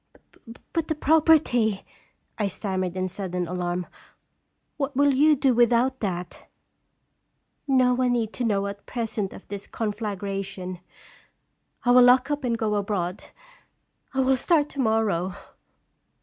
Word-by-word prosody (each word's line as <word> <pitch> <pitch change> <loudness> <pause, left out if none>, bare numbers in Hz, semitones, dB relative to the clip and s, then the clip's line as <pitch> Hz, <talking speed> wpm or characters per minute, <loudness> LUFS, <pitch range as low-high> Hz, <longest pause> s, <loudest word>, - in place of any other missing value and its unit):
" 230 0 -16
But 330 -2 -1
the 315 - -1
property 295 -9 +3 0.5
I'M 205 -2 +1
stammered 185 -2 -3
in 185 0 -1
sudden 180 -1 -3
alarm. 180 0 -3 0.5
" - - -49
What 280 -2 -3
will 285 +1 +4
you 300 +3 +5
do 270 -2 +2
without 240 +2 +3
that?" 180 -4 -5 0.6
" - - -49
No 255 -2 +4
one 250 0 +1
need 230 -1 -2
know 205 -5 +1
at 200 0 -7
present 220 -5 -3
of - - -13
this 200 0 -7
con 215 -2 -3
flagration. 195 -3 -5 1.1
I 245 - +4
will 250 +1 +7
lock 255 +3 +5
up 290 -1 -2
and 235 -2 0
go 220 -2 -1
abroad. 200 -3 -2 0.9
I 265 - 0
will 265 0 +3
start 300 +1 +2
to 280 - -9
morrow 215 -7 +1
225 Hz, 145 wpm, -25 LUFS, 195-260 Hz, 1.1 s, will